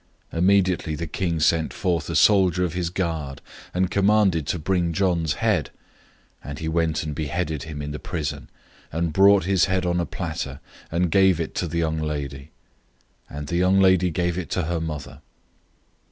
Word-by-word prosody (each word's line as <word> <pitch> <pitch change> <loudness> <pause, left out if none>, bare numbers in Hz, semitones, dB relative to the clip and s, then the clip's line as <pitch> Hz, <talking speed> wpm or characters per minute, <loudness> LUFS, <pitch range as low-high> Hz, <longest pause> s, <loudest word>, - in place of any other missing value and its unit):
006:027 - - -4
Immediately 90 -3 +2
the 85 - -4
king 85 0 -2
sent 80 +4 0
out 85 -4 0
a 85 - -2
soldier 90 0 +4
of 85 - -4
his 90 -2 -2
guard, 80 -7 -3 0.3
and 90 0 0
commanded 100 -6 +3
to 85 - 0
bring 85 +1 0
John's 85 -4 +1
head, - - 0 0.7
and 70 0 -7
he 80 - -4
went 80 -1 0
and 75 -1 -4
beheaded 80 0 -2
him 75 -2 -6
in 75 - -5
the 75 - -5
prison, 75 -4 -4 0.4
006:028 - - -5
and 85 -2 -1
brought 100 +1 +6
his 95 -2 +3
head 95 -1 0
on 90 0 +1
a 85 - -1
platter, 80 -6 -5 0.3
and 85 0 0
gave 95 -2 +4
it 80 - -3
to 90 - -2
the 85 - -4
young 80 -1 0
lady; 75 -2 -4 0.8
and 75 +1 -6
the 85 +4 -2
young 95 +2 +3
lady 95 -1 +4
gave 85 +1 -1
it 90 - -6
to 90 - -1
her 85 +1 -2
mother. 75 -3 -6
85 Hz, 185 wpm, -24 LUFS, 75-90 Hz, 0.8 s, brought